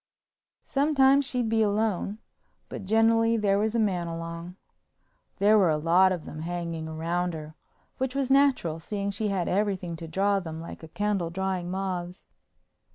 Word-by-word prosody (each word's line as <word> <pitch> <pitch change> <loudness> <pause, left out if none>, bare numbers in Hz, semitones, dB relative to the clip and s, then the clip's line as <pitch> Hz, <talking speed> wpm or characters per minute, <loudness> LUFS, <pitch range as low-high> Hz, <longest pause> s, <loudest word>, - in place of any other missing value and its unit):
Sometimes 275 -1 +3
she'd 250 -3 -1
be 225 0 +2
alone 210 -1 0 0.5
but - - -7
generally 225 +2 +3
there 200 -2 +2
was 220 +2 0
a - - +2
man 185 -5 0
along. 165 +1 -6 0.8
There 210 +2 +5
were 185 -4 +4
a 155 - +2
lot 175 +4 +4
of 175 -4 -3
them 155 - -8
hanging 170 -1 -4
round 170 +2 -2
her, 155 0 -8 0.5
which 260 0 -2
was 270 -1 0
natural, 270 - +3
seeing 200 +4 -3
she 210 +2 -2
had 190 -4 -1
everything 190 -3 -1
to 165 - -8
draw 195 +4 +1
them 160 -3 -7
like 165 - -9
a 160 - -9
candle 200 -1 -1
drawing 185 0 -2
moths. 185 -1 -4
190 Hz, 160 wpm, -27 LUFS, 170-220 Hz, 0.8 s, There